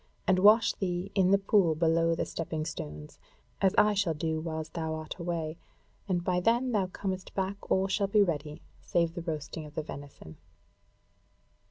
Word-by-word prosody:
And 185 -1 +3
wash 210 +4 +6
thee 180 0 -3
in 190 -2 +3
the 200 - +6
pool 195 -4 +3
below 165 +1 +2
the - - -1
stepping 160 -1 -4
stones, 75 - -7 0.4
as 190 -1 +3
I 210 0 +5
shall 195 -5 +1
do 160 +1 -1
whiles 160 -1 -4
thou 160 -1 -3
art 155 -1 -6
away, 170 -2 -3 0.5
and 175 -2 0
by 180 0 +1
then 240 +6 +2
thou 200 -5 +1
comest 185 0 -5
back, 195 +1 -3
all 190 0 +2
shall 200 +1 +1
be 205 +1 +4
ready, 150 -4 -3 0.2
save 170 -1 0
the 170 - -5
roasting 155 -1 -5
of 150 - -15
the 155 - -2
venison." 140 - -10
170 Hz, 175 wpm, -29 LUFS, 160-195 Hz, 0.5 s, wash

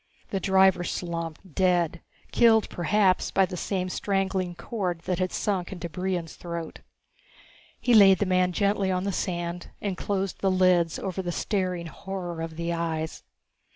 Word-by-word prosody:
The 195 - 0
driver 190 -1 +4
slumped, 170 -1 -5
dead, 175 -2 +1 0.3
killed 225 -2 +5
perhaps 185 +2 +2
by 195 - +3
the 180 - -7
same 185 +1 -2
strangling 190 -2 -1
cord 180 -2 -3
that 180 +1 -2
had 185 0 0
sunk 190 -4 -1
into 175 -2 -5
Brion's 180 -1 -3
throat. 170 -2 -6 1.0
He 245 - +2
laid 195 -3 +8
the 205 - 0
man 185 -1 +2
gently 200 +1 +1
on 185 0 0
the 200 - -1
sand 175 -1 -3
and 200 -3 -2
closed 195 +1 -2
the 195 - +3
lids 185 -3 +3
over 190 -1 -3
the 175 -1 -3
staring 185 -2 -1
horror 175 0 -6
of 165 -1 -5
the 170 +1 -2
eyes. 160 -1 -3
185 Hz, 155 wpm, -26 LUFS, 170-195 Hz, 1.0 s, laid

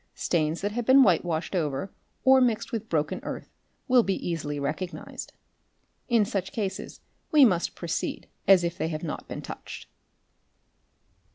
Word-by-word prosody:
Stains 160 -1 0
that 205 +1 -1
have 240 +1 -3
been 265 +1 +8
white 185 -8 +4
washed 170 0 -2
over 150 +1 -1 0.3
or 265 0 +6
mixed 235 -4 +1
with 225 -1 -4
broken 150 -2 0
earth - - -7 0.3
will 255 -2 +6
be 195 -4 0
easily 150 -4 -3
recognised. 155 +6 -5 0.8
In 230 -3 +4
such 195 -2 -3
cases 200 -4 -4 0.3
we 295 -3 +8
must 180 -7 +1
proceed 170 -2 -3 0.2
as 190 -2 +7
if 170 0 -3
they - - 0
have 155 0 -4
not 160 - -5
been - - -6
touched. - - -8
185 Hz, 155 wpm, -27 LUFS, 160-225 Hz, 0.8 s, been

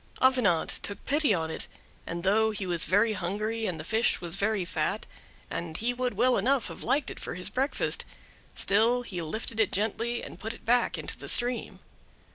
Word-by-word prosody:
Avenant 250 -10 +3
took 200 - -4
pity 290 -2 +3
on 160 -4 +1
it, - - -6 0.4
and 170 +1 -4
though 220 +3 +4
he 210 -3 -3
was 175 -3 0
very 205 +6 +3
hungry, 215 +4 -2
and 170 -3 -3
the - - -5
fish 225 +7 +2
was 170 -2 -4
very 200 -1 +1
fat, - - -1 0.4
and 165 -2 -4
he 240 +2 0
would 250 0 -1
well 255 0 +4
enough 260 +4 +2
have - - -8
liked 280 0 +1
it - - -8
for - - -5
his 180 - -2
breakfast, 270 +3 0 0.5
still 230 +5 +3
he 185 -7 -5
lifted 220 +7 -4
it 220 - +3
gently 225 +4 -1
and - - -9
put 225 0 -4
it - - -17
back 245 +1 +3
into - - -4
the - - -8
stream. 245 0 +1
220 Hz, 195 wpm, -29 LUFS, 185-245 Hz, 0.5 s, though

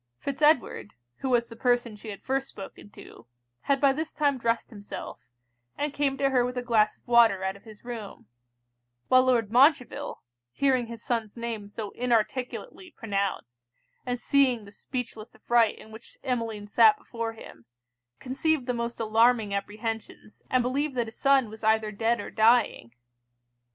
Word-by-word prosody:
Fitz 280 - -5
Edward, 250 - +2 0.2
who 265 - -3
was 240 -2 +2
the 230 - -11
person 240 -2 +1
she 215 +1 -10
had 200 - -8
first 270 +1 -1
spoken 200 +1 -11
to, 115 - -14 0.4
had 275 -1 +2
by 275 -1 +4
this 315 +3 -4
time 285 -3 +1
dressed 230 +1 -1
himself, 205 - -9 0.5
and 295 0 -2
came 280 -2 0
to 275 0 +1
her 250 -2 +3
with 250 +1 -3
a 250 - -2
glass 220 -3 +2
of - - -40
water 230 -5 +5
out 190 0 -2
of 200 - -17
his 215 0 -14
room; 230 - -7 0.8
while 255 0 +6
Lord 235 -5 +2
Montreville, 260 +1 +2 0.3
hearing 260 -4 +1
his 230 -1 -9
son's 230 -2 -2
name 230 -3 -4
so 205 -1 -6
inarticulately 250 - -2
pronounced, 195 - -3 0.4
and 245 -1 -3
seeing 255 -6 +2
the 200 - -13
speechless 230 -1 -6
affright 235 -2 +2
in 220 - -14
which 220 +1 -13
Emmeline 230 -5 -2
sat 420 - +5
before 230 - -5
him, 115 - -13 0.5
conceived 270 +2 0
the 250 - -1
most 235 0 -4
alarming 225 -1 +3
apprehensions, 215 +2 -5
and 255 -1 +2
believed 275 +3 -1
that 240 -2 0
his 225 - -11
son 275 -3 +4
was 220 +1 -12
either 220 0 +2
dead 230 +3 0
or 205 - -6
dying. 220 - +3
235 Hz, 165 wpm, -27 LUFS, 215-255 Hz, 0.8 s, while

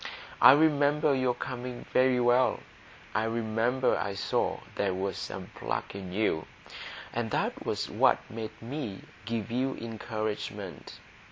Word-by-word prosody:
I - - +11
remember 145 -1 +4
your 130 -2 +2
coming 125 -1 -5
very 130 -1 +4
well; 120 +1 +3 0.5
I 110 +2 +1
remember 115 +3 +1
I 100 -1 -2
saw 100 - 0
there 95 -2 0
was 95 +1 -2
some - - -6
pluck - - -3
in 95 -2 -6
you, 95 -5 0 0.7
and 115 -1 -1
that - - -1
was - - -1
what - - +4
made 110 0 -6
me 115 -6 -5 0.2
give 115 0 -3
you 130 +2 0
encouragement. 110 -2 -5
115 Hz, 135 wpm, -29 LUFS, 110-130 Hz, 0.7 s, I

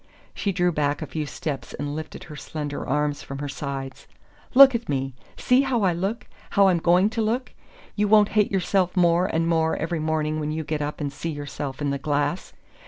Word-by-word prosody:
She 200 - -1
drew 180 -1 +1
back 145 -2 -1
a - - -3
few 155 -2 -4
steps 145 -1 -5
and 145 0 -4
lifted 155 0 -7
her 150 - -10
slender 145 0 -5
arms 145 +1 0
from 135 - -7
her 145 +1 -4
sides. 135 -2 -6 0.5
"Look 270 0 +10
at 235 0 -3
me 135 -1 -1 0.2
see 250 +1 +4
how 260 -5 0
I 185 -2 +3
look 195 +7 -3 0.2
how 200 -2 +5
I'm 175 -2 +2
going 180 +5 +3
to 225 - -1
look! 235 +4 -1 0.4
YOU 210 0 +1
won't 210 0 +5
hate 210 -1 +2
yourself 190 -1 +1
more 175 +1 +4
and 165 -1 0
more 160 -1 +2
every 165 0 -2
morning 155 0 -1
when 150 0 -2
you 160 +1 -3
get 150 0 -3
up 150 +1 -4
and 140 -1 -3
see 145 +4 -4
yourself 145 -2 -5
in 140 - 0
the 140 - -2
glass! 145 +4 -1
160 Hz, 210 wpm, -24 LUFS, 145-190 Hz, 0.5 s, Look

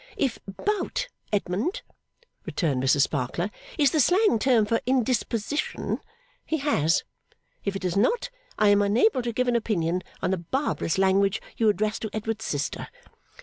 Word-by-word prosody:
'If 265 -5 0
Bout, 405 - -2 0.2
Edmund,' 205 - -1 0.6
returned 145 -8 -1
Mrs 135 +2 +3
Sparkler, 150 +8 -1 0.3
'is 285 -3 +4
the 315 - +1
slang 360 - +4
term 235 -3 +4
for 230 +2 +1
indisposition, 255 +1 0 0.4
he 320 - -1
has. 165 - +2 0.6
If 200 -1 -1
it 195 - -4
is 180 - 0
not, 465 - +1 0.3
I 210 - +4
am 205 0 +5
unable 240 - +3
to 240 -1 -2
give 250 +2 0
an 245 - +2
opinion 180 -6 0 0.2
on - - 0
the 190 - 0
barbarous 185 - -1
language 195 +2 +3 0.2
you 225 -2 +3
address 210 +2 0
to 220 - -4
Edward's 220 0 -3
sister. 145 -1 -2
215 Hz, 150 wpm, -26 LUFS, 190-260 Hz, 0.6 s, am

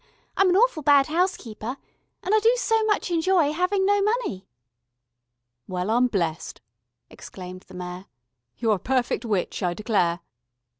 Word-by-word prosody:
I'm 385 -1 +4
an 360 - +3
awful 440 -6 +3
bad 285 -1 +5
house 355 +5 0
keeper. 225 +2 -7 0.5
And 380 - -1
I 435 - +6
do 455 +3 +4
so 450 -3 +1
much 420 -4 0
enjoy 335 -2 +2
having 375 +4 +1
no 405 +1 +3
money." 420 - -1 1.2
"Well, 185 +2 -2
I'm 245 +2 +3
blessed," 170 -8 -3 0.5
exclaimed 185 0 -10
the - - -13
Mayor. 180 +1 -7 0.5
"You're 220 -3 +1
a - - -15
perfect 255 +1 -1
witch, 205 -4 -2
I 175 -2 -1
declare." 180 -6 0
265 Hz, 150 wpm, -24 LUFS, -, 1.2 s, I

